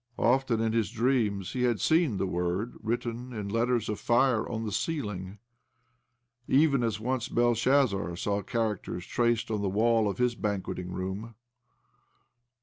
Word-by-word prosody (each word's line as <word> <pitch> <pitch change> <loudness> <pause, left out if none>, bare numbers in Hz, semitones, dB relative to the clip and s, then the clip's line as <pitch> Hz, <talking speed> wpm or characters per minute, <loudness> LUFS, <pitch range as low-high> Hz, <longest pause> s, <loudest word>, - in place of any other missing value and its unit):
Often 125 -1 +2
in 110 -1 0
his 115 -2 +1
dreams 115 -5 0
had 125 -1 +2
he - - -8
seen 160 - +2
the 95 - 0
word 90 +5 -2
written 120 +2 -3
in 105 -3 -4
letters 115 +1 +1
of 105 - -3
fire 120 -1 +2
on 115 -1 -3
the 105 - -3
ceiling, 105 - -3 1.1
even 140 -1 +4
as 115 -2 -1
once 125 +1 -1
Belshazzar 120 -5 +2
saw 100 +3 -1
characters 105 -4 -2
traced 120 -2 0
on 105 -2 -1
the 100 - 0
wall 110 +2 +2
of 95 - -4
his 125 -1 +2
banqueting 100 -4 -3
room. 95 +5 -5
115 Hz, 145 wpm, -29 LUFS, 100-120 Hz, 1.1 s, even